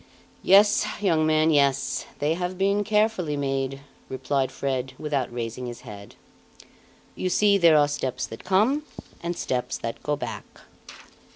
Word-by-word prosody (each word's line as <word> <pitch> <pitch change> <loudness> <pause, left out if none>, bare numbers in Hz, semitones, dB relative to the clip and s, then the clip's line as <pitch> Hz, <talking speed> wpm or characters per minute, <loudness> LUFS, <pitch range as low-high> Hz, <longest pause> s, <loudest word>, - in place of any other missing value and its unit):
"Yes, 205 +2 +5
young 165 -6 +2
man, 155 +1 +3
yes, 140 -2 +1
they 150 +2 0
have 180 +1 -4
been 200 +2 +1
carefully 210 -7 +1
made," 135 -1 -2 0.3
replied 130 0 -1
Fred 130 -1 -3
without 145 -5 -2
raising 120 +1 -5
his 120 -1 -8
head. 100 -1 -11 1.0
"You 185 - -2
see, 205 +2 +3
there 165 -3 +6
are 145 -1 +4
steps 140 -3 -3
that 115 - -10
come, 215 +11 +2 0.4
and 170 0 -3
steps 125 -1 -2
that 115 0 -6
go 150 - -1
back." 115 -7 -8
150 Hz, 145 wpm, -25 LUFS, 130-185 Hz, 1.0 s, there